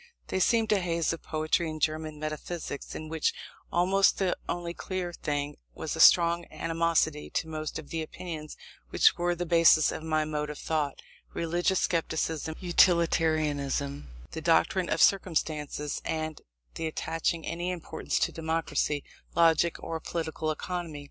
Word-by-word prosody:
They 190 - 0
seemed 225 +3 +3
a 210 - +4
haze 170 -3 0
of 165 - -7
poetry 155 +2 0
and 155 0 -6
German 155 0 -1
metaphysics, 155 0 -5
in 155 - -6
which 160 0 0 0.4
almost 190 +3 +3
the 190 -2 +1
only 170 0 -3
clear 180 -1 -4
thing 145 -2 -3 0.2
was - - -4
a - - -6
strong 170 0 +6
animosity 165 -2 0
to 160 - -2
most 155 -1 -4
of 155 -3 -9
the 165 - -2
opinions 155 -1 -7 0.3
which - - +5
were 175 0 0
the 175 +1 -3
basis 165 -2 +5
of - - -5
my 155 -1 0
mode 150 -1 -2
of 150 - -6
thought; 150 -3 -2 0.3
religious 175 +3 +1
scepticism, 160 -2 -1
utilitarianism, 155 - +2 0.2
the 160 - -5
doctrine 170 +2 +2
of 165 - +3
circumstances, 155 -6 0
and 155 -1 -3 0.3
the 165 - -3
attaching 165 +1 -2
any 175 +2 -3
importance 180 -3 -3
to - - +2
democracy, 160 -3 -1 0.3
logic, 170 0 +4
or 165 -1 -3
political 160 -1 -3
economy. 170 -1 -4
160 Hz, 150 wpm, -29 LUFS, 155-175 Hz, 0.4 s, strong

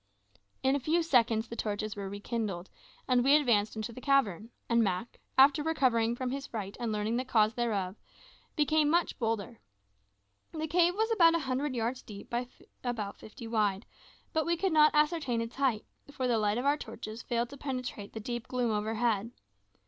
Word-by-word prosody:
In 265 +1 +3
a - - 0
few 325 +6 +1
seconds 235 -7 +2
the 230 - -7
torches 215 -1 -3
were 200 -1 -5
rekindled, 205 -3 -4 0.4
and 250 -1 +3
we 275 +3 +6
advanced 230 -9 +2
into 220 +2 -4
the 255 - -9
cavern; 230 - +1 0.2
and 235 -1 +3
Mak, 195 +3 -2 0.2
after 280 +3 +6
recovering 250 -7 +2
from 250 0 -3
his 275 +1 -4
fright 205 -3 -5
and 235 -2 -2
learning 215 +2 -1
the 255 - 0
cause 220 -4 +3
thereof, 210 -5 -1 0.6
became 300 -1 +3
much 340 +2 +1
bolder. 225 -1 -2 0.9
The 315 -1 -2
cave 345 +3 +3
was 440 +2 0
about 335 -6 +5
a - - +2
hundred 265 +1 -1
yards 240 +2 -2
deep 200 -2 -11
by 240 +1 -1 0.4
about 220 -5 -3
fifty 220 +2 -10
wide; 210 -3 0 0.5
but 315 - +2
we 340 0 +1
could 380 -1 0
not 305 -1 +7
ascertain 300 -5 +2
its 230 +2 -5
height, 260 -6 +1 0.3
for 260 -3 -2
the 235 -2 +2
light 210 +1 +1
of 250 - -2
our 285 +1 +3
torches 220 -5 -7
failed 235 -1 -1
to 280 - -9
penetrate 250 -7 -5
the 220 - -5
deep 240 +2 -5
gloom 250 -2 0
overhead. 220 0 0
240 Hz, 185 wpm, -30 LUFS, 215-280 Hz, 0.9 s, not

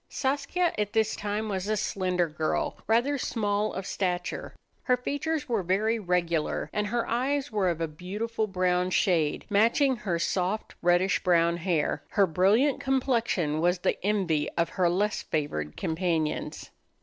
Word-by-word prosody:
Saskia 285 +6 0
at 210 -1 -1
this 220 -1 +2
time 210 +1 -3
was 195 -2 -3
a 215 0 +1
slender 185 -3 0
girl, 155 0 -1
rather 250 +6 +2
small 210 -3 0
of 190 - -5
stature. 180 -3 -3 0.3
Her 250 -1 +3
features 290 +4 -2
were 230 -5 0
very 210 +6 +1
regular, 175 -4 -1
and 210 0 0
her 235 +2 -1
eyes 265 +3 0
were 200 -4 +1
of 170 -2 -2
a 165 - 0
beautiful 210 +8 -3
brown 180 -1 +1
shade, 170 -5 +1
matching 235 +6 +3
her 190 -6 -2
soft 185 +4 -1
reddish 175 +2 +3
brown 170 -1 +3
hair. 170 -3 0
Her 200 -2 +3
brilliant 200 - +3
complexion 235 - 0
was 175 +2 +3
the 175 - -1
envy 185 -7 +1
of 170 -1 +2
her 180 -2 +1
less 205 +4 0
favored 75 - -3
companions. 160 -2 -2
195 Hz, 150 wpm, -27 LUFS, 175-225 Hz, 0.3 s, Her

